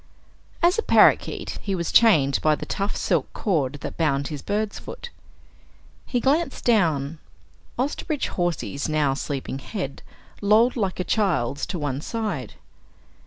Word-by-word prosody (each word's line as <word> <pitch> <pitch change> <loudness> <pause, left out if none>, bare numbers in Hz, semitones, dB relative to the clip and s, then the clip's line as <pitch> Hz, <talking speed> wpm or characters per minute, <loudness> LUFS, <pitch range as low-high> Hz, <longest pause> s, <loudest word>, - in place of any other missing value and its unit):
As 355 +6 +4
a - - +3
parakeet, - - +3
he 195 -2 -2
was 170 -2 -2
chained 150 - +5
by 155 -1 +3
the - - -7
tough 200 0 -2
silk - - 0
cord 150 - 0
that - - -6
bound 140 -4 +1
his 150 -3 -5
bird's 210 0 -2
foot. 485 - -9 1.0
He 250 - 0
glanced 275 +3 0
down. 160 - +2 0.6
Osterbridge 285 +3 -2
Hawsey's 170 -5 -2
now 150 -3 +2
sleeping 135 -1 -4
head 140 -4 -5 0.4
lolled 215 +4 +4
like 195 -7 -2
a - - +1
child's 175 - 0
to 185 - -4
one 145 -3 -3
side. 200 - -4
175 Hz, 140 wpm, -24 LUFS, 140-220 Hz, 1.0 s, chained